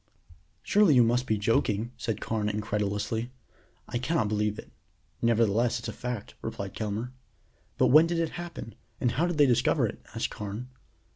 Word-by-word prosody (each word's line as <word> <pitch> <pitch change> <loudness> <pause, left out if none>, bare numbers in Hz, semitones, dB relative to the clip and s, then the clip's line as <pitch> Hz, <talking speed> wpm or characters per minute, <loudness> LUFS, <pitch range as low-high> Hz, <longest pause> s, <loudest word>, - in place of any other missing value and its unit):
"Surely 205 -8 +5
you 125 - +7
must 120 +2 +1
be 110 - +1
joking," 110 +1 +1
said 115 -3 -3
Carrie 105 -2 -1
incredulously. 105 +2 -2 0.6
"I 120 - -2
cannot 125 -5 0
believe 105 0 0
it." - - -10 0.5
"Nevertheless 115 +1 +2
it's 120 - -5
a - - -5
fact," 125 -4 -5
replied 100 -1 -5
Kelmare. 110 +3 -3 0.7
"But - - +4
when 155 +5 +7
did 170 0 -1
it 165 -1 +1
happen? 170 -10 -7 0.3
and 125 - +1
how 165 +8 +1
did 175 -3 -2
they 145 - +7
discover 125 -4 +3
it?" - - -5
asked - - -1
Carne. 105 +5 -6
115 Hz, 165 wpm, -28 LUFS, 105-125 Hz, 0.7 s, you